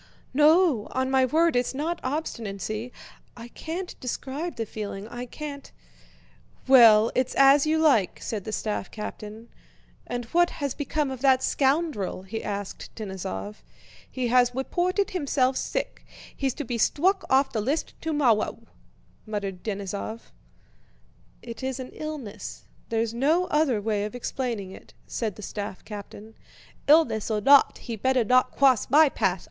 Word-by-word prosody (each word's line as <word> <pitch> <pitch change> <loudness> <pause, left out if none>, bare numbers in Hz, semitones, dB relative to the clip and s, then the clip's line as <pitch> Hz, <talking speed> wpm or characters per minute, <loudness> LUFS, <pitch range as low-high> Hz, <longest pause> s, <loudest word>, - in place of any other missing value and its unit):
"No, 300 - +4
on 260 0 0
my 265 -1 +4
word 320 +4 +2
it's 245 +1 0
not 330 +5 -2
obstinacy! 230 - -4 0.5
I 235 0 -9
can't 345 +8 -6
describe 275 +6 -4
the 230 - -3
feeling. 205 -1 -6
I 240 +2 -7
can't..." 285 +1 -8 1.0
"Well, 230 -4 +7
it's 255 0 0
as 275 +2 +6
you 315 +1 +2
like," 275 - +3
said 210 -4 -4
the 220 - -5
staff 210 -2 -3
captain. 215 +1 -8 0.6
"And 245 -1 -4
what 345 0 +4
has 280 -3 -2
become 290 -1 -2
of 260 -2 -7
that 265 -2 +4
scoundrel?" 270 - 0
he 220 +4 -6
asked 200 -1 -5
Denísov. 140 - -5 0.5
"He 250 -2 -2
has 245 0 +3
weported 360 +9 0
himself 275 -6 +1
sick, - - -3 0.3
he's 270 -2 -1
to 295 - -4
be 240 -2 -4
stwuck 375 - +2
off 270 +1 +3
the 220 - -1
list 280 +9 -2
tomowwow," 275 -11 +1 0.7
muttered 200 -4 -4
Denísov. 200 +2 -5 1.1
"It 235 +1 -8
is 265 0 -3
an 255 - -7
illness, 300 -9 -7 0.3
there's 225 0 -1
no 305 +9 +2
other 295 -7 +2
way 205 -1 -1
of 215 - -7
explaining 240 -6 -3
it," - - -14
said 220 -4 -3
the 210 - -10
staff 200 -1 -6
captain. 210 +1 -9 0.5
"Illness 295 -9 +4
or 215 -1 0
not, 275 +6 +5
he'd 225 -4 -5
better 260 -2 +3
not 255 +3 +3
cwoss 265 -4 +4
my 305 +4 +7
path. - - 0
250 Hz, 145 wpm, -26 LUFS, 215-290 Hz, 1.1 s, Well